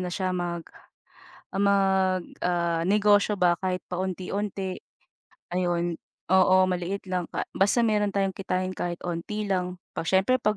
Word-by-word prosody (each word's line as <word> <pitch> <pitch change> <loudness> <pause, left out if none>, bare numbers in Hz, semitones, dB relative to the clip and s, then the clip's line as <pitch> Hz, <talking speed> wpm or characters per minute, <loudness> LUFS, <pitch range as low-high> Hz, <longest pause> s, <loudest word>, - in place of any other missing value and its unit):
na 180 - -2
siya? 185 +1 -1
Mag 175 -2 -3 0.9
ah, 195 - 0
magnegosyo 190 +1 +2
ba? 175 -1 +4
Kahit 185 -1 -1
paunti-unti, 190 +1 -3 0.8
ayun. 175 -1 0 0.4
Oo, 185 0 +6
maliit 185 +1 -2
lang 180 -2 -2
pa - - -3
basta 205 +5 +3
meron 210 -2 +2
tayong 195 -1 0
kitain 185 0 -2
kahit 175 -1 -3
onti 180 +5 -3
lang. 180 -2 -1 0.2
Siyempre 190 +9 +2
'pag 215 -2 +1
185 Hz, 125 wpm, -26 LUFS, 180-200 Hz, 0.9 s, Oo